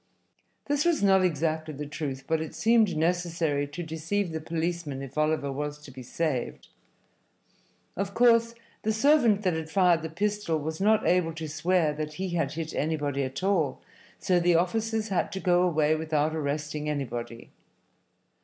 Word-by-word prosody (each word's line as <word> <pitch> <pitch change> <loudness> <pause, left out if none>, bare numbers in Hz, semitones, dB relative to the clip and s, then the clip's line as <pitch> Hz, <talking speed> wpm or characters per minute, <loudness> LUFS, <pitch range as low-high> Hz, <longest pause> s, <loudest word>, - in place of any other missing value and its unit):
This 290 0 +1
was 340 -9 +1
not 190 -1 +5
exactly 155 -2 -1
the 150 +2 -5
truth, 140 -3 -5
but 160 -1 0
it 160 - -6
seemed 220 -6 +3
necessary 165 -3 0
to 160 +5 -6
deceive 165 +4 -2
the 160 0 -4
policemen 160 -3 -3
if 135 0 -10
Oliver 155 -2 0
was 145 +2 -4
to 150 -2 -13
be 130 0 -10
saved. 130 0 -3 1.3
Of 200 +1 -3
course, 230 -1 +4 0.3
the 220 - 0
servant 225 -4 +4
that 185 -2 +2
had 160 -1 -4
fired 175 -2 +3
the 160 - -5
pistol 205 -1 -1
was 160 +3 -4
not 215 +2 +3
able 175 -2 +2
to 160 -1 -5
swear 155 +1 +1
that 150 0 -5
he 185 +4 -4
had 165 -5 -1
hit 160 0 -5
anybody 145 -2 -1
at 130 +6 -4
all, 170 -9 +1 0.4
so 180 -1 +2
the 175 0 +3
officers 220 +5 0
had 195 +1 0
to 190 - -3
go 180 -2 +3
away 155 -4 +2
without 155 -1 0
arresting 150 0 -3
anybody. 120 -5 -5
160 Hz, 165 wpm, -27 LUFS, 150-190 Hz, 1.3 s, not